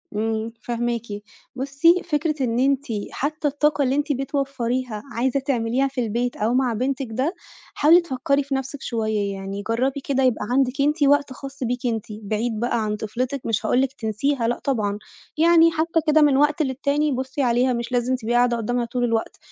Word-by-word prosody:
امم، 220 Hz, +1 st, -1 dB
فاهماكِ. 240 Hz, 0 st, -2 dB, 0.5 s
بُصي، 280 Hz, +7 st, +3 dB
فكرة 305 Hz, -1 st, 0 dB
إن 235 Hz, -1 st, 0 dB
أنتِ 275 Hz, +1 st, +2 dB, 0.3 s
حتّى 305 Hz, +2 st, -2 dB
الطاقة 290 Hz, +1 st, +1 dB
اللي 265 Hz, 0 st, +1 dB
أنتِ 290 Hz, +1 st, 0 dB
بتوفريها 260 Hz, -4 st, -2 dB
عايزة 255 Hz, +3 st, +1 dB
تعمليها 260 Hz, 0 st, 0 dB
في 260 Hz, -2 st, -3 dB
البيت 240 Hz, +2 st, -1 dB
أو 220 Hz, +3 st, 0 dB
مع 255 Hz, -2 st, +2 dB
بنتِك 260 Hz, +3 st, -2 dB
ده، 265 Hz, +10 st, -1 dB, 0.4 s
حاولي 330 Hz, +4 st, +6 dB
تفكّري 280 Hz, -2 st, 0 dB
في 275 Hz, 0 st, -3 dB
نَفْسِك 265 Hz, +1 st, -4 dB
شويّة 215 Hz, -3 st, -1 dB
يعني 195 Hz, +1 st, -6 dB
جرّبي 260 Hz, +5 st, 0 dB
كده 270 Hz, -1 st, 0 dB
يبقى 250 Hz, -5 st, +1 dB
عندِك 270 Hz, +1 st, +1 dB
أنتِ 295 Hz, +2 st, +2 dB
وقت 285 Hz, -1 st, +3 dB
خاص 275 Hz, +1 st, -8 dB
بيكِ 245 Hz, +1 st, -2 dB
أنتِ، 225 Hz, -3 st, -1 dB, 0.2 s
بعيد 215 Hz, +2 st, -2 dB
بقى 235 Hz, -1 st, 0 dB
عن 210 Hz, 0 st, -1 dB
طفلتِك 245 Hz, +6 st, -3 dB
مش 225 Hz, -2 st, -1 dB
هاقول 255 Hz, -, +3 dB
لِك 270 Hz, 0 st, -1 dB
تنسيها 230 Hz, +2 st, -1 dB
لأ 240 Hz, -, -1 dB
طبعًا، 210 Hz, -7 st, -1 dB, 0.4 s
يعني 330 Hz, 0 st, +6 dB
حتّى 330 Hz, +1 st, +1 dB
كده 310 Hz, 0 st, +5 dB
من 285 Hz, -3 st, +5 dB
وقت 295 Hz, +2 st, +3 dB
للتاني 285 Hz, +2 st, 0 dB
بُصي 260 Hz, +2 st, -3 dB
عليها 250 Hz, 0 st, +2 dB
مش 235 Hz, +1 st, -4 dB
لازم 250 Hz, +1 st, +1 dB
تبقي 240 Hz, -2 st, -3 dB
قاعدة 240 Hz, 0 st, +3 dB
قدامها 240 Hz, +2 st, -1 dB
طول 245 Hz, +1 st, -2 dB
الوقت، 230 Hz, -2 st, -1 dB
255 Hz, 180 wpm, -23 LUFS, 235-280 Hz, 0.5 s, حاولي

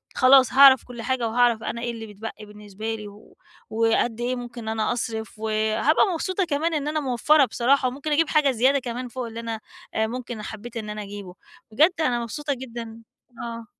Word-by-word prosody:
خلاص 255 Hz, -1 st, +6 dB
هاعرف 270 Hz, -1 st, +8 dB
كل 245 Hz, -2 st, -8 dB
حاجة، 250 Hz, -1 st, -1 dB
وهاعرف 235 Hz, -1 st, +2 dB
أنا 235 Hz, -, -4 dB
إيه 240 Hz, 0 st, -2 dB
اللي 225 Hz, -1 st, -7 dB
بتبقي 210 Hz, +1 st, -8 dB
بالنسبة 210 Hz, +1 st, -6 dB
لي، 210 Hz, -1 st, -8 dB
و 205 Hz, +1 st, -16 dB, 0.3 s
وقد 225 Hz, +1 st, +1 dB
إيه 250 Hz, +1 st, -1 dB
ممكن 245 Hz, -1 st, -7 dB
إن 220 Hz, -, -5 dB
أنا 220 Hz, +1 st, 0 dB
أصرف، 225 Hz, -2 st, -4 dB
وهابقى 220 Hz, -, +2 dB
مبسوطة 370 Hz, +3 st, -1 dB
كمان 320 Hz, +2 st, -1 dB
إن 295 Hz, -1 st, -1 dB
أنا 310 Hz, +1 st, 0 dB
موفَرّة 275 Hz, +2 st, +3 dB
بصراحة، 255 Hz, +3 st, +2 dB
وممكن 280 Hz, +4 st, -4 dB
أجيب 305 Hz, +2 st, +2 dB
حاجة 300 Hz, -3 st, +3 dB
زيادة 260 Hz, +3 st, +3 dB
كمان 250 Hz, 0 st, -5 dB
فوق 245 Hz, 0 st, -5 dB
اللي 230 Hz, 0 st, -7 dB
أنا 230 Hz, -1 st, -4 dB, 0.3 s
آآ 220 Hz, 0 st, +1 dB
ممكن 240 Hz, -1 st, -6 dB
حبّيت 225 Hz, +2 st, -8 dB
إن 215 Hz, -1 st, -5 dB
أنا 210 Hz, 0 st, -5 dB
أجيبه. 200 Hz, -2 st, -9 dB, 0.4 s
بجد 310 Hz, +11 st, +5 dB
أنا 250 Hz, -6 st, +1 dB
مبسوطة 285 Hz, +5 st, -3 dB
جدًا 230 Hz, -3 st, -8 dB, 0.4 s
آه. 230 Hz, -1 st, -6 dB
235 Hz, 190 wpm, -24 LUFS, 220-265 Hz, 0.4 s, هاعرف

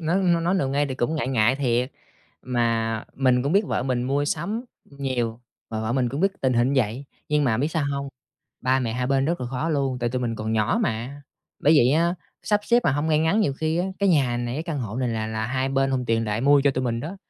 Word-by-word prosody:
ng 175 Hz, +3 st, +2 dB
nói 170 Hz, -1 st, +1 dB
nói 175 Hz, +3 st, +1 dB
nào 160 Hz, -8 st, +1 dB
ngay 145 Hz, +2 st, +1 dB
thì 130 Hz, -, -4 dB
cũng 130 Hz, +4 st, -1 dB
ngại 150 Hz, -4 st, -1 dB
ngại 125 Hz, 0 st, +3 dB
thiệt, 125 Hz, -1 st, 0 dB, 0.5 s
mà 115 Hz, -2 st, 0 dB
mình 125 Hz, -2 st, +2 dB
cũng 140 Hz, +4 st, -1 dB
biết 200 Hz, +2 st, +3 dB
vợ -, -, -1 dB
mình 125 Hz, -1 st, -1 dB
mua 140 Hz, +3 st, 0 dB
sắm 200 Hz, -, -2 dB, 0.3 s
nhiều, 125 Hz, -4 st, -3 dB, 0.3 s
mà 110 Hz, -1 st, -3 dB
vợ 110 Hz, +1 st, -2 dB
mình 125 Hz, -1 st, +1 dB
cũng 140 Hz, +5 st, -4 dB
biết 195 Hz, +1 st, +2 dB
tình 130 Hz, -1 st, +2 dB
hình 120 Hz, +2 st, +2 dB
vậy. 125 Hz, +2 st, 0 dB, 0.2 s
Nhưng 150 Hz, 0 st, +2 dB
mà 110 Hz, -4 st, +2 dB
biết 145 Hz, +4 st, +1 dB
sao 160 Hz, -2 st, -1 dB
hông? 140 Hz, 0 st, -3 dB, 0.5 s
Ba 130 Hz, +1 st, +2 dB
mẹ 115 Hz, -3 st, -2 dB
hai 125 Hz, +2 st, -1 dB
bên 135 Hz, 0 st, +2 dB
rất 170 Hz, +2 st, -1 dB
là 125 Hz, -, -3 dB
khó 130 Hz, +6 st, -2 dB
luôn, 135 Hz, -5 st, 0 dB
tại 120 Hz, -1 st, 0 dB
tụi 125 Hz, +1 st, -2 dB
mình 115 Hz, -2 st, -1 dB
còn 110 Hz, 0 st, -3 dB
nhỏ 110 Hz, -, +1 dB
mà, 130 Hz, -, -3 dB, 0.4 s
bởi 150 Hz, -, +5 dB
vậy 125 Hz, -3 st, +5 dB
á, 170 Hz, +3 st, +2 dB, 0.3 s
sắp 210 Hz, -1 st, +1 dB
xếp 240 Hz, +2 st, +4 dB
mà -, -, +3 dB
hông 145 Hz, +3 st, -1 dB
ngay 155 Hz, -1 st, +3 dB
ngắn, 160 Hz, +8 st, +2 dB
nhiều 145 Hz, -, +2 dB
khi 160 Hz, +4 st, -1 dB
á, 180 Hz, -, 0 dB
cái 200 Hz, -, +2 dB
nhà 135 Hz, -8 st, +3 dB
này, 120 Hz, 0 st, -3 dB
cái 155 Hz, -, -2 dB
căn 165 Hz, -5 st, -3 dB
hộ 110 Hz, -2 st, -5 dB
này 130 Hz, -1 st, 0 dB
là 110 Hz, -2 st, -2 dB
là 110 Hz, 0 st, -3 dB
hai 130 Hz, +2 st, -1 dB
bên 135 Hz, 0 st, +1 dB
hùn 130 Hz, -1 st, 0 dB
tiền 115 Hz, 0 st, +1 dB
lại 105 Hz, +1 st, -1 dB
mua 140 Hz, +1 st, +5 dB
cho 140 Hz, -, +5 dB
tụi 130 Hz, -1 st, -2 dB
mình 115 Hz, -1 st, -1 dB
đó, 165 Hz, +9 st, -6 dB
135 Hz, 265 wpm, -24 LUFS, 120-150 Hz, 0.5 s, bởi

